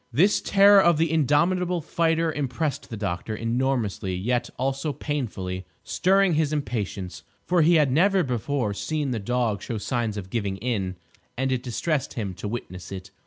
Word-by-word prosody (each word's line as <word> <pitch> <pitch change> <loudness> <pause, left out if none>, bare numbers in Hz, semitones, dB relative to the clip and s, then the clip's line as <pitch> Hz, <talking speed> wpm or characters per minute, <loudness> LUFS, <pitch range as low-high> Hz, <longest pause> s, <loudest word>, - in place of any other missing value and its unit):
This 190 +8 +3
terror 200 0 +6
of 170 -3 +4
the 160 0 +1
indomitable 170 +4 +2
fighter 165 0 0
impressed 140 0 -2
the 115 - -5
doctor 100 +1 -3
enormously; 115 -5 -1
yet 120 +6 -1
also 135 +3 -1
painfully; 100 -11 -3 0.2
stirring 195 -1 +3
his 155 -1 +1
impatience; 105 - -3 0.2
for 175 -1 +3
he 170 +3 +5
had 150 -4 +4
never 190 +6 +4
before 125 -3 -1
seen 150 +5 -2
the 115 - -1
dog 115 -1 -1
show 115 - -4
signs 110 0 -2
of 95 -2 -7
giving 100 -4 -2
in, 100 -5 -2 0.4
and 130 +1 0
it 130 -2 0
distressed 135 +4 -2
him 100 -5 -3
to 90 - -6
witness 90 -6 -6
it. 95 0 -7
130 Hz, 165 wpm, -25 LUFS, 105-155 Hz, 0.4 s, terror